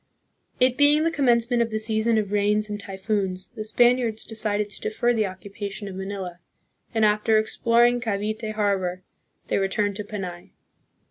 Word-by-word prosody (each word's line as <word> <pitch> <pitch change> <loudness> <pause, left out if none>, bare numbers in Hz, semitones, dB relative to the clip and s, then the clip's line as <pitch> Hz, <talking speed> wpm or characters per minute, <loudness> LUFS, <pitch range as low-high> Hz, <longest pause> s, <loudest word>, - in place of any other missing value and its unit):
It 255 +1 +3
being 295 +2 +5
the 330 - +1
commence 240 -6 +2
ment 240 -1 +3
of 230 - +1
the 220 - -2
season 220 +1 +1
of 205 -2 -1
rains 210 +1 +1
and 205 - -4
typhoons, 190 -1 -2
the 215 - -7
Spaniards 240 0 +2
decided 210 -2 0
to - - -9
defer 240 +3 0
the 215 -3 +1
occupation 200 +2 -7
of 195 - -6
Manila, 190 -2 -6 0.5
and, 220 -1 +2
after 210 +1 +3
ex 215 0 0
ploring 240 +1 +3
Cavite 215 0 -2
harbor, 190 -4 -1 0.4
they - - +1
returned 200 +1 0
to 210 - -4
Panay. 185 -4 -7
215 Hz, 165 wpm, -24 LUFS, 200-230 Hz, 0.5 s, being